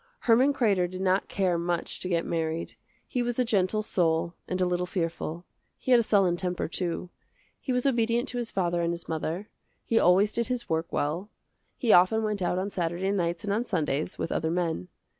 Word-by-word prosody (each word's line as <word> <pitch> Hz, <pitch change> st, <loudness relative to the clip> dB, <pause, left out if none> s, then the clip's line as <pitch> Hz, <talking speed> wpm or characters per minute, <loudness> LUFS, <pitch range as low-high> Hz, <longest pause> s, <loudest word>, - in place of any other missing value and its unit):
Herman 250 Hz, +4 st, +4 dB
Kreder 200 Hz, -10 st, +2 dB
did 185 Hz, +1 st, -7 dB
not 190 Hz, +1 st, +2 dB
care 180 Hz, -3 st, 0 dB
much 170 Hz, 0 st, -2 dB
to 180 Hz, -, -4 dB
get 170 Hz, -2 st, +1 dB
married. 165 Hz, 0 st, -2 dB, 0.3 s
He 250 Hz, -, -1 dB
was 240 Hz, -1 st, -1 dB
a 250 Hz, -, +2 dB
gentle 215 Hz, -1 st, +1 dB
soul 170 Hz, -3 st, +1 dB
and 185 Hz, -, -2 dB
a 185 Hz, -, +3 dB
little 180 Hz, 0 st, 0 dB
fearful. 170 Hz, -1 st, -3 dB, 0.3 s
He 260 Hz, -, -3 dB
had 245 Hz, -, +8 dB
a -, -, +4 dB
sullen 195 Hz, -5 st, +3 dB
temper, 180 Hz, 0 st, -2 dB
too. 175 Hz, 0 st, -3 dB, 0.5 s
He 260 Hz, -, -4 dB
was 250 Hz, +1 st, 0 dB
obedient 240 Hz, -1 st, +2 dB
to 245 Hz, -, -3 dB
his 235 Hz, -2 st, -2 dB
father 175 Hz, -2 st, 0 dB
and 170 Hz, 0 st, 0 dB
his 170 Hz, -, -7 dB
mother. 165 Hz, +5 st, -3 dB, 0.4 s
He 230 Hz, -, +3 dB
always 190 Hz, +4 st, +4 dB
did 235 Hz, -1 st, +1 dB
his 250 Hz, -1 st, -3 dB
work 160 Hz, +1 st, -1 dB
well. 165 Hz, +8 st, -2 dB, 0.5 s
He 235 Hz, -5 st, +3 dB
often 185 Hz, +5 st, +5 dB
went 210 Hz, -2 st, -1 dB
out 180 Hz, 0 st, 0 dB
on 195 Hz, +2 st, -2 dB
Saturday 175 Hz, +2 st, -1 dB
nights 170 Hz, -3 st, -1 dB
and 200 Hz, -1 st, -1 dB
on 225 Hz, +3 st, +1 dB
Sundays, 155 Hz, -, -1 dB
with -, -, -3 dB
other 160 Hz, -, 0 dB
men. 165 Hz, -, -1 dB
185 Hz, 205 wpm, -27 LUFS, 170-220 Hz, 0.5 s, had